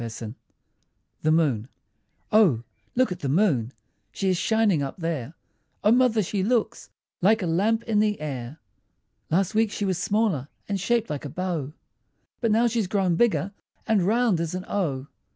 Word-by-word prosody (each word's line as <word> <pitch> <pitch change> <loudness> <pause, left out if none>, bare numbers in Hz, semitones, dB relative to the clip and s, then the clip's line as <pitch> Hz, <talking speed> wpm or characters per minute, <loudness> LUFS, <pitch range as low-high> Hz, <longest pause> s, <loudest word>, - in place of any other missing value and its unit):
_ 115 0 -6 0.9
THE 155 - +2
MOON 140 -8 +1 0.6
O, 180 - +4 0.3
look 255 -4 +2
at 180 - -4
the 140 - -3
moon! 140 - +2 0.4
She 190 - -1
is 185 - +2
shining 220 -6 +2
up 135 -1 -4
there; 165 -4 -3 0.5
O 210 - +5
mother, 240 -3 +4
she 195 +2 -2
looks 225 +3 0 0.3
Like 210 +3 +4
a - - 0
lamp 210 +7 +1
in 220 -3 +1
the 210 -1 +1
air. 140 -2 -5 0.7
Last 185 +5 +1
week 220 0 +3
she 205 - -2
was 185 -3 -1
smaller, 200 - 0 0.2
And 200 -1 -2
shaped 230 +2 0
like 145 0 -4
a - - -4
bow; 165 -3 -3 0.7
But 230 - +1
now 225 +3 +3
she's 230 -4 0
grown 190 -3 +1
bigger, 200 -1 +2 0.3
And 215 -3 +2
round 215 0 +2
as 170 +1 -2
an 185 +1 -5
O. 140 -10 -1
185 Hz, 170 wpm, -25 LUFS, 155-220 Hz, 0.9 s, O